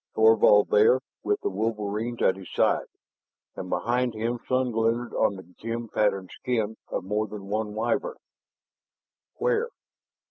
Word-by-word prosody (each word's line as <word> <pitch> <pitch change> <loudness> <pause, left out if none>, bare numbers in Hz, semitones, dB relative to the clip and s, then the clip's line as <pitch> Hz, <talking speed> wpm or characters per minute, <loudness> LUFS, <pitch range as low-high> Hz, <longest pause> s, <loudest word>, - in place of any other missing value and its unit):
Thorvald 110 -2 +6
there, 110 +5 +5 0.2
with 415 0 0
the 405 - -1
wolverines 110 +1 -2
at 95 - +4
his 95 -2 -11
side. - - +2 0.7
And 90 - -6
behind 120 +2 0
him 115 +2 -2
sun 130 -1 +1
glinted 115 +2 0
on 100 - +2
the 95 - -9 0.2
gem 115 0 -4
patterned 100 -3 0
skin 110 -3 -1
of - - -3
more 105 +3 -1
than 100 -1 -9
one 105 0 -2
Wyvern. 480 - -1 1.2
"Where?" 475 -1 +1
110 Hz, 140 wpm, -26 LUFS, 105-120 Hz, 1.2 s, Thorvald